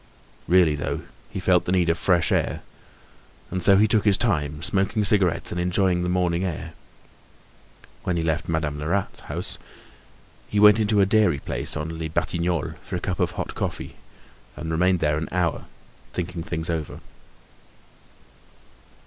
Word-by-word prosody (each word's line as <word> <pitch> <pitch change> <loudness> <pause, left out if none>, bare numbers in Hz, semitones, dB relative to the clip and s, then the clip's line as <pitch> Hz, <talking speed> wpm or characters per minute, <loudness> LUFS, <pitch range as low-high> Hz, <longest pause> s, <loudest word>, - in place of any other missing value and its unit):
Really 90 -3 +5
though, 70 - -3 0.3
he - - -5
felt 90 -1 +3
the - - -1
need 90 -2 +2
of 85 - +3
fresh 85 -2 +2
air, - - 0 0.9
and 90 0 -2
so 95 +2 +6
he 105 +2 +5
took 105 0 +2
his 100 -2 +4
time, 75 -8 -1
smoking 100 +3 +1
cigarettes 95 -4 +2
and 90 - -2
enjoying 90 0 +1
the 90 - -1
morning 90 -1 +1
air. 90 -5 -4 1.3
When 90 - -1
he 85 - 0
left 80 +1 -1
Madame 80 -3 -1
Lerat's 90 +6 -1
house, - - -6 0.9
he 105 - 0
went 105 +1 +7
into 105 -1 +3
a - - +5
dairy 100 -6 +3
place 70 - -3
on 80 +1 -5
Les 80 - -2
Batignolles 85 -1 -1
for - - -6
a - - -1
cup - - -3
of - - 0
hot - - -4
coffee - - -4 0.6
and 80 +1 -5
remained 90 +2 +2
there 75 -1 +1
an 80 - -5
hour, 90 -3 -1 0.5
thinking 90 -1 -4
things 80 -1 -4
over. 80 -3 -4
90 Hz, 160 wpm, -24 LUFS, 80-95 Hz, 1.3 s, went